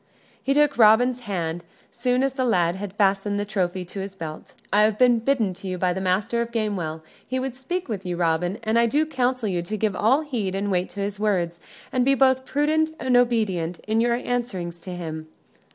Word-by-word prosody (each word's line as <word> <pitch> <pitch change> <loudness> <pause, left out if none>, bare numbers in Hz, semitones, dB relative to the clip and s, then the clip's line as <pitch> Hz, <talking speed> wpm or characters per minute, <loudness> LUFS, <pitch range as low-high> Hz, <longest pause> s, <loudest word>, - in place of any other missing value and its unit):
He 275 - 0
took 295 -3 +3
Robin's 235 +3 +5
hand, 175 -7 -3 0.3
soon 250 +1 0
as 270 -1 0
the 265 -1 -1
lad 175 -8 +2
had 200 0 -5
fastened 200 0 +1
the 205 - -1
trophy 185 -3 -1
in 180 +2 -6
his 195 0 -7
belt. 160 -4 -8 0.2
"I 210 - +5
have 215 0 +3
been 245 -1 +5
bidden 225 -5 +1
to 190 +2 -9
you 185 -1 -3
by 180 0 +1
the 190 - -4
Master 205 +6 0
of 235 0 -3
Gamewell. 190 -9 -2 0.2
He 260 - -2
would 260 -1 -3
speak 325 +8 -4
with 205 -5 -4
you, 180 -2 -3
Robin; 175 +3 0
and 220 +1 +2
I 235 - +4
do 295 +6 +2
counsel 255 -5 0
you 180 -3 -1
to 210 +5 -4
give 210 -1 0
all 250 +10 +3
heed 230 -11 -3
and 200 +1 -1
weight 180 0 0
to 200 - -6
his 200 0 -3
words, 175 -5 0 0.3
and 255 -2 +2
be 275 +2 +4
both 260 -1 +3
prudent 310 +2 +1
and 255 -1 +1
obedient 215 -9 +1
in 220 +1 +2
your 235 0 +2
answerings 225 -9 -3
to 180 +1 -7
him." 160 -2 -6
210 Hz, 215 wpm, -24 LUFS, 185-250 Hz, 0.3 s, Robin's